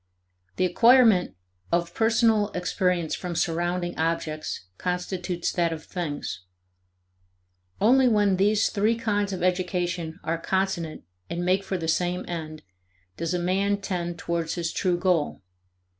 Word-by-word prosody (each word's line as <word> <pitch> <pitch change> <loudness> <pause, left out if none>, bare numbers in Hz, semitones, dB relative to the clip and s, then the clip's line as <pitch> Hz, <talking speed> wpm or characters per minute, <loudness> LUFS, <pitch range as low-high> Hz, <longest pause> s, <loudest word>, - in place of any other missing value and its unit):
The 185 - +2
acquirement 230 0 +5 0.4
of 170 0 0
personal 225 -2 +3
experience 180 -2 0
from 180 -2 -4
surrounding 175 +1 -1
objects 155 - -2
constitutes 180 -1 -2
that 170 -2 +1
of 160 -1 -5
things. 150 - -5 1.4
Only 255 +5 +5
when 205 -4 +3
these 205 +2 +3
three 215 +2 +1
kinds 205 -3 -1
of 185 -2 -4
education 180 -2 -1
are 165 +1 -1
consonant 190 -3 -1 0.3
and 175 +1 -3
make 185 +2 +2
for 190 -1 -2
the 165 -2 -4
same 180 +2 0
end, 155 -3 -6 0.5
does 170 +2 -2
a - - +1
man 195 +3 +1
tend 175 -3 -3
towards 170 -1 -2
his 170 -1 -2
true 180 -2 +1
goal. 175 - 0
180 Hz, 130 wpm, -26 LUFS, 170-195 Hz, 1.4 s, acquirement